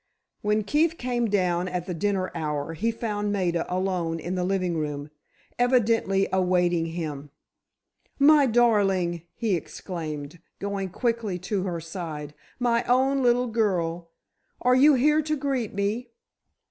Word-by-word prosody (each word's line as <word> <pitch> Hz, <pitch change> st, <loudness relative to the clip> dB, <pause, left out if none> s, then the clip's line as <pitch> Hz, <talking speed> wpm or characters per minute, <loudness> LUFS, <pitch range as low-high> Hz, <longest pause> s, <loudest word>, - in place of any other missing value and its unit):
When 210 Hz, +1 st, +1 dB
Keefe 310 Hz, +9 st, +1 dB
came 245 Hz, -2 st, -1 dB
down 180 Hz, -3 st, +1 dB
at 180 Hz, -1 st, -3 dB
the 180 Hz, -, -4 dB
dinner 190 Hz, +1 st, -1 dB
hour, 150 Hz, 0 st, -3 dB
he 215 Hz, +8 st, -1 dB
found 210 Hz, -3 st, -2 dB
Maida 180 Hz, -4 st, -1 dB
alone 180 Hz, -3 st, -1 dB
in 175 Hz, +3 st, -4 dB
the 180 Hz, -1 st, -1 dB
living 185 Hz, -2 st, 0 dB
room, 150 Hz, -1 st, -4 dB, 0.5 s
evidently 230 Hz, -6 st, +2 dB
awaiting 180 Hz, -2 st, +2 dB
him. 155 Hz, -4 st, -5 dB, 0.9 s
"My 285 Hz, 0 st, +6 dB
darling!" 200 Hz, -8 st, +2 dB
he 220 Hz, -4 st, 0 dB
exclaimed, 155 Hz, -2 st, -6 dB, 0.2 s
going 200 Hz, -1 st, -3 dB
quickly 225 Hz, -1 st, -1 dB, 0.2 s
to 195 Hz, -2 st, +1 dB
her 175 Hz, -3 st, -2 dB
side, 160 Hz, -3 st, -6 dB, 0.2 s
"my 235 Hz, -2 st, +1 dB
own 265 Hz, +2 st, +3 dB
little 245 Hz, 0 st, +3 dB
girl! 175 Hz, -7 st, -1 dB, 0.5 s
Are 250 Hz, -, +3 dB
you 280 Hz, +3 st, +6 dB
here 300 Hz, +4 st, +3 dB
to 305 Hz, 0 st, -1 dB
greet 265 Hz, -7 st, -2 dB
me?" 210 Hz, +5 st, -1 dB
195 Hz, 135 wpm, -26 LUFS, 175-240 Hz, 0.9 s, My